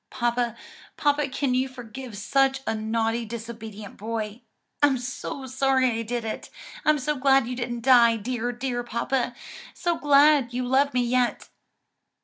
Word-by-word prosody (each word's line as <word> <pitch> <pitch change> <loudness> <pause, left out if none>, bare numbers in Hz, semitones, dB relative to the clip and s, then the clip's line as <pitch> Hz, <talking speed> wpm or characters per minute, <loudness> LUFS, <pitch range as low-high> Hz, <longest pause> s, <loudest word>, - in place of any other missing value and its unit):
"Papa, 240 -1 -1 0.4
papa, 290 -1 +1
can 275 -1 -1
you 255 +1 +1
forgive 250 -2 -9
such 270 +5 +2
a - - 0
naughty 225 +1 -1
disobedient 220 -2 -8
boy? 220 +1 -4 0.4
I'm 285 -2 +4
so 265 +2 -5
sorry 260 0 +2
I 225 0 -2
did 235 +1 -3
it! 220 - -5 0.3
I'm 305 0 +4
so 295 +2 -1
glad 270 -1 +4
you 250 - -3
didn't 240 -1 -4
die, 235 -2 +6
dear, 240 +2 -2
dear 245 0 -3
papa! 240 +1 -1 0.4
so 345 -1 -1
glad 285 -3 +5
you 250 0 -1
love 275 +2 +2
me 250 - +3
yet." 245 0 0
245 Hz, 150 wpm, -25 LUFS, 230-270 Hz, 0.4 s, die